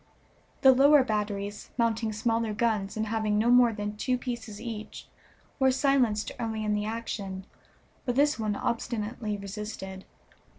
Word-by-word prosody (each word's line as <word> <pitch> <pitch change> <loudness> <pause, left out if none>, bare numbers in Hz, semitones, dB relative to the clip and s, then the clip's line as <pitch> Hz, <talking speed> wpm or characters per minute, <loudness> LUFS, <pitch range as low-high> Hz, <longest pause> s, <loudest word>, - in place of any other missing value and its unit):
The 265 - +8
lower 280 +2 +6
batteries, 205 -2 -3
mounting 230 -2 +1
smaller 225 0 0
guns 215 -3 0
and 220 - 0
having 215 -1 0
no 230 +3 +3
more 245 -1 +6
than 210 -1 -4
two 250 +3 0
pieces 235 -4 -6
each, 220 -2 -7 0.5
were 265 -1 +5
silenced 255 -5 +2
early 220 -2 -2
in 210 - +1
the 210 0 -1
action, 205 -4 -4 0.6
but 245 - -1
this 290 -1 +3
one 215 -2 -1
obstinately 220 -1 -2
resisted. 200 -1 -7
220 Hz, 140 wpm, -28 LUFS, 210-240 Hz, 0.6 s, The